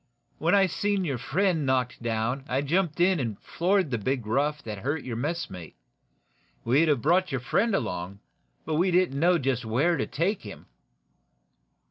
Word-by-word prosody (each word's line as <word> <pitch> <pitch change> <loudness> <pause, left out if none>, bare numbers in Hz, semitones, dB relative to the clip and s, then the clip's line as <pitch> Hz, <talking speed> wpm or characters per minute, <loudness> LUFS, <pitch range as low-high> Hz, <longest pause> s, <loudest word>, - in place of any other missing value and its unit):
When 165 +5 +3
I 195 -1 +5
seen 200 +1 -1
your 135 -6 -2
friend 170 - +1
knocked 130 -2 0
down 115 +3 -1
I 130 +2 +1
jumped 165 +2 0
in 180 0 +3
and 115 -6 -3
floored 185 -3 0
the 115 - 0
big 125 +2 -2
rough 145 +6 0
that 105 -3 -6
hurt 145 +7 -2
your 120 -3 -5
messmate. 120 - -4 0.9
We'd 140 +8 +3
have 140 -7 +1
brought 185 +1 +3
your 130 -2 -2
friend 200 - +1
along, 90 - -3 0.5
but 155 - -1
we 180 +3 +3
didn't 175 -6 +2
know 175 +2 +4
just 130 -4 -1
where 140 +10 +1
to - - -2
take 180 +6 -1
him." 105 - -10
145 Hz, 170 wpm, -27 LUFS, 120-175 Hz, 0.9 s, I